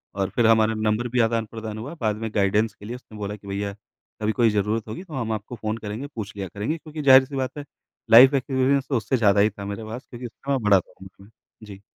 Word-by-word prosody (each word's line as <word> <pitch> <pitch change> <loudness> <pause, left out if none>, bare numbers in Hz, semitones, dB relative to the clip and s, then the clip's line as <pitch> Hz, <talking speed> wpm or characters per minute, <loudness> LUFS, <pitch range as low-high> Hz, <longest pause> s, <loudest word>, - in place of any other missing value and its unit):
और 100 0 -1
फिर 115 -2 +4
हमारा 110 0 +4
नंबर 110 +3 0
भी 125 +1 -1
आदान-प्रदान 115 -1 -1
हुआ। 135 +9 -6
बाद 105 -2 +1
में 110 0 -4
गाइडेंस 105 +2 +2
के 105 - -14
लिए 120 +3 -5
उसने 110 -4 -13
बोला 105 0 -4
कि 100 -1 -15
भैया 100 0 -3 0.5
कभी 110 +1 +1
कोई 115 0 +3
ज़रूरत 105 +2 -1
होगी 110 - -6
तो 165 -5 -13
हम 115 -4 -2
आपको 110 +3 -5
फ़ोन 110 0 -3
करेंगे, 110 +5 -6
पूछ 105 -7 -7
लिया 95 -1 -4
करेंगे। 105 - -3
क्योंकि 155 -1 -8
ज़ाहिर-सी 135 0 +6
बात 130 +2 -3
है 145 - -6 0.5
लाइफ 130 +5 +9
एक्सपीरियंस 135 0 +1
तो 130 - +2
उससे 115 +4 0
ज़्यादा 100 -3 +3
ही 105 +2 +5
था 100 -1 -9
मेरे 100 +2 -5
पास 115 +4 -7
क्योंकि 120 0 -8
उससे 135 +4 -7
मैं 135 -3 +1
बड़ा 100 -2 +5
था - - -13
उम्र 95 +1 -14
मे। 100 - -18 0.4
जी। 100 -1 -11
110 Hz, 245 wpm, -24 LUFS, 105-130 Hz, 0.5 s, लाइफ